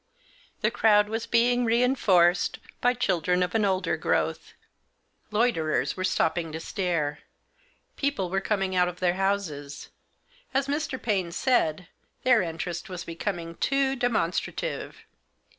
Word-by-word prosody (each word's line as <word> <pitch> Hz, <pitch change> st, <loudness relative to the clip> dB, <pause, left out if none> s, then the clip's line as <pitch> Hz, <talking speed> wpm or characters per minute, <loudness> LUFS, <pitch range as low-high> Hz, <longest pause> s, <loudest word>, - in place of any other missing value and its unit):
The -, -, +2 dB
crowd 210 Hz, -1 st, +4 dB
was 225 Hz, +1 st, -3 dB
being 245 Hz, +1 st, +3 dB
reinforced 225 Hz, -7 st, +3 dB, 0.2 s
by 245 Hz, +1 st, +3 dB
children 180 Hz, -5 st, +1 dB
of 180 Hz, -, -3 dB
an 220 Hz, -, +2 dB
older 190 Hz, -1 st, +1 dB
growth. -, -, -1 dB, 0.8 s
Loiterers 210 Hz, -8 st, +1 dB
were 185 Hz, -, -4 dB
stopping 165 Hz, -2 st, 0 dB
to 160 Hz, -, -4 dB
stare. 165 Hz, -5 st, -2 dB, 0.8 s
People 275 Hz, -11 st, -1 dB
were 195 Hz, 0 st, 0 dB
coming 195 Hz, -2 st, -1 dB
out 180 Hz, 0 st, +4 dB
of 180 Hz, 0 st, -6 dB
their 180 Hz, -1 st, +2 dB
houses. 180 Hz, -8 st, -2 dB, 0.7 s
As 270 Hz, 0 st, +2 dB
Mr. 290 Hz, -2 st, -2 dB
Paine 195 Hz, -6 st, -1 dB
said, 180 Hz, -6 st, +1 dB, 0.4 s
their 250 Hz, -3 st, +5 dB
interest 170 Hz, +2 st, -4 dB
was 180 Hz, -2 st, -5 dB
becoming 170 Hz, -1 st, -5 dB
too 275 Hz, 0 st, +1 dB
demonstra 235 Hz, -9 st, 0 dB
tive. -, -, -5 dB
195 Hz, 130 wpm, -26 LUFS, 175-240 Hz, 0.8 s, their